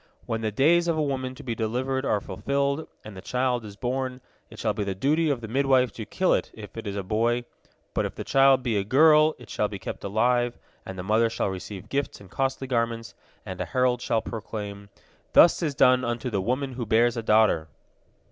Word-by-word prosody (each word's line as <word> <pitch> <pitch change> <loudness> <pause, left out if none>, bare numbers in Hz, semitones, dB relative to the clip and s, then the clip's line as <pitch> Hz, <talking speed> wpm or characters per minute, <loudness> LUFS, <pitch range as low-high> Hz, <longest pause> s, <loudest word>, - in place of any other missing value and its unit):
When 115 -1 -2
the 110 -1 -1
days 170 +10 +3
of 165 -2 +1
a 155 - +1
woman 130 -2 -3
to - - -11
be 120 - -3
delivered 130 +4 -2
are 105 - +2
fulfilled, 140 +6 -2 0.2
and 105 -2 -9
the 95 - -8
child 125 +2 -1
is 105 -2 -9
born, 130 +2 -3 0.3
it - - -13
shall - - 0
be 105 - -2
the 100 -1 -3
duty 150 - +1
of 135 -4 -1
the 110 - -6
midwife 130 +1 +2
to 110 -3 -8
kill 185 +8 +1
it, - - 0
if 105 -3 -11
it 115 - -7
be 100 -1 -4
a 100 - -2
boy. 115 +5 0 0.5
But - - 0
if - - -12
the - - -5
child 135 -1 +4
be 115 -4 0
a 100 - +1
girl, 155 +6 +5
it 120 - -14
shall 105 - -1
be 105 - -7
kept - - -7
alive, 120 +4 +1 0.3
and 95 - -7
the 90 - -5
mother 110 +4 +2
shall 115 - -1
receive 95 0 -7
gifts 140 +1 -2
and 95 -3 -15
costly 135 0 -1
garments, 115 -2 -2 0.3
and - - -6
a - - -1
herald 125 -1 +1
shall 115 -3 0
proclaim, 105 -2 -6 0.4
'Thus 170 - +6
is 150 -5 -1
done 130 -1 +5
unto 120 +1 -2
the 100 -3 0
woman 130 +6 -2
who 120 -3 -5
bears 115 +2 +3
a 115 - -2
daughter!'" 105 -7 +3
120 Hz, 225 wpm, -26 LUFS, 110-135 Hz, 0.5 s, Thus